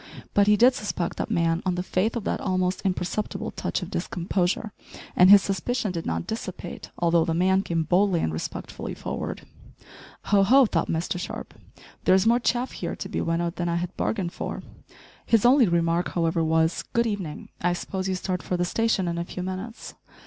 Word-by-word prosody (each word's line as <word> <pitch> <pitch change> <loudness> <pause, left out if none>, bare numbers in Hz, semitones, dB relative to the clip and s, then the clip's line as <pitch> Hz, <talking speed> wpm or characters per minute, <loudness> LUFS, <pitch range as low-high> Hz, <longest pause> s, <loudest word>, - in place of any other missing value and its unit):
But 205 0 +4
he 210 0 +5
did 250 +4 +6
suspect 205 -7 -3
that - - -3
man 170 -4 +1
on 185 -2 0
the 180 - -2
faith 190 +5 0
of 235 - -3
that - - -2
almost 185 -1 0
imperceptible 190 +2 -2
touch - - -3
of - - -8
discomposure, 180 +4 -1 0.4
and 180 +1 +7
his 200 -1 +9
suspicion 210 +2 -1
did 165 -2 -4
not 80 0 -2
dissipate 185 -5 -6
although 170 -1 +3
the 165 0 -1
man 190 +2 +3
came 165 -4 -1
boldly 180 +2 +2
and 80 - -1
respectfully 80 - -5
forward. - - -5 0.8
"Ho 200 -1 +3
ho!" 260 +7 +6
thought 170 -7 0
Mr 170 +2 -1
Sharp, - - -6 0.5
"there 185 - +6
is 190 +1 +3
more 235 +2 +4
chaff 245 +1 0
here - - -4
to - - -6
be - - -2
winnowed 170 +1 -1
than 175 -1 -1
I 170 - 0
had 175 +2 -3
bargained 185 -5 -2
for." - - -5 0.6
His 230 -1 +3
only 250 -1 +6
remark, 170 0 +1
however, 165 -1 +1
was 160 +1 +2
"Good 235 0 +3
evening; 190 -9 -4
I 175 0 +2
suppose 190 +2 -3
you 190 - 0
start 185 0 -2
for 180 - -2
the 175 - +1
station 215 -1 +1
in 170 0 -2
a - - -1
few 180 +1 -6
minutes?" 190 +5 -6
185 Hz, 195 wpm, -25 LUFS, 170-205 Hz, 0.8 s, his